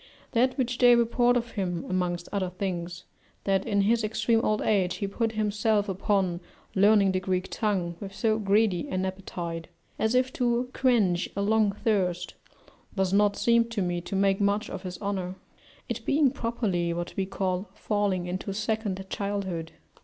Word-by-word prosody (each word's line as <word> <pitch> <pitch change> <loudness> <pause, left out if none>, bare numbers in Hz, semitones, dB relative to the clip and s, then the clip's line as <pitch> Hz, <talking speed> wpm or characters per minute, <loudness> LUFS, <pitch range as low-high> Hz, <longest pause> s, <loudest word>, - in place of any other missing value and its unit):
That 255 +3 +2
which 250 -2 -1
they, 245 -1 +7
report 240 +1 +3
of 235 -1 -3
him, 180 -4 -2
amongst 175 -1 -1
other 195 -3 -1
things, 175 -2 -4 0.4
that 195 +1 +1
in 200 -2 +2
his 225 +3 +2
extreme 225 +2 +1
old 215 -1 +1
age 190 -4 +2
he 205 - -3
put 225 +3 -1
himself 210 0 +1
upon 190 -2 0 0.3
learning 200 0 +5
the 185 - 0
Greek 185 0 -2
tongue 185 -6 -1
with 195 -1 -7
so 220 -1 +1
greedy 200 -3 +2
an 185 0 -1
appetite, 175 -3 -5 0.3
as 220 +3 +1
if 255 0 +2
to 245 0 0
quench 210 -9 +2
a 200 - 0
long 215 -1 +3
thirst, 185 -5 0 0.6
does 190 -1 +1
not 205 0 +4
seem 235 +2 +4
to 230 -4 -2
me 175 -1 -1
to 185 - -5
make 195 0 +2
much 205 +2 +1
for - - -5
his 180 -2 -7
honour; 190 -2 -2 0.5
it 235 -1 -4
being 280 +1 +3
properly 195 -9 -1
what 175 0 -5
we 190 -1 -1
call 190 0 -2
falling 205 -4 0
into 185 +3 -4
second 215 -3 -2
childhood. 190 -5 -3
200 Hz, 170 wpm, -27 LUFS, 185-220 Hz, 0.6 s, they